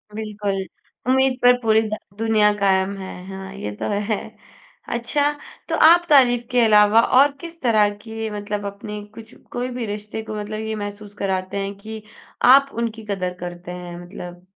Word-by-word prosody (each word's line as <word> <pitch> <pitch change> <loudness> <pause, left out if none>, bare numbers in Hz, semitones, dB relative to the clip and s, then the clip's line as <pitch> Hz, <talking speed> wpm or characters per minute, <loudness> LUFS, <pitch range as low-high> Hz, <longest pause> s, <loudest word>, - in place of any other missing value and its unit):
बिल्कुल, 210 -2 -3 0.5
उम्मीद 265 0 +3
पर 245 0 +7
पूरी 220 -1 +4
द 215 - -2 0.2
दुनिया 215 -2 +3
कायम 190 0 +2
है। 190 -1 -7 0.2
हाँ, 195 0 -8
ये 105 - -5
तो - - -1 0.2
है। 215 - +2 0.7
अच्छा 285 +5 +1 0.4
तो - - +1
आप 345 +1 +6
तारीफ़ 245 -4 +5
के 245 - +4
अलावा 210 +1 +6 0.2
और 280 +1 +6
किस 335 0 -9
तरह 215 -4 +4
की 225 -1 -5
मतलब 205 0 -4
अपनी 205 +1 -6
कुछ 225 -1 -12 0.2
कोई 245 +1 -3
भी 240 - -2
रिश्ते 210 +1 -5
को - - -4
मतलब 215 +1 -4
ये 220 0 -3
महसूस 205 0 -7
कराते 190 -1 -2
हैं 200 0 -3
कि 220 +1 -8 0.5
आप 275 0 +3
उनकी 225 -1 -4
कदर 185 -2 -2
करते 175 0 -7
हैं। 175 -1 -7
मतलब? 175 0 -10
210 Hz, 170 wpm, -22 LUFS, 200-230 Hz, 0.7 s, पर